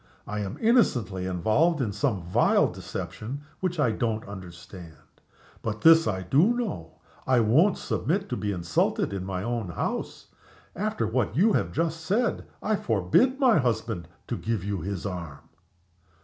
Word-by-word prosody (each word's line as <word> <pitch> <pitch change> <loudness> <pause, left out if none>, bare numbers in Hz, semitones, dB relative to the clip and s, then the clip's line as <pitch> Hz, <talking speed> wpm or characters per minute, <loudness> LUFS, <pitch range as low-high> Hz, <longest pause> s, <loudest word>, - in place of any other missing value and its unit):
I 105 - -4
am 100 -1 -4
innocently 120 - +2
involved 110 - +2
in 115 -6 0
some 105 -5 -1
vile 85 - +3
deception 95 +10 -6 0.2
which 180 -3 -2
I 125 -6 +3
don't 110 -1 -2
understand. 90 -3 -10 0.7
But 105 -2 -4
this 165 0 +7
I 95 -3 -1
do 155 - +3
know 85 - -4 0.3
I 130 -2 +4
won't 140 - +4
submit 135 - -1
to 125 - -1
be 105 -3 -2
insulted 85 +1 0
in 95 -2 -3
my 95 -1 -4
own 115 -4 -2
house. 85 - -4 0.5
After 210 - -1
what 110 -1 -1
you 210 +5 +4
have - - 0
just 165 0 -1
said 215 +8 0 0.2
I 215 -1 +1
forbid 120 - +2
my 250 - +5
husband 110 - -1 0.2
to 120 - -3
give 110 -5 -2
you 100 -3 -3
his 95 +1 -4
arm." 85 -7 -5
110 Hz, 155 wpm, -26 LUFS, -, 0.7 s, this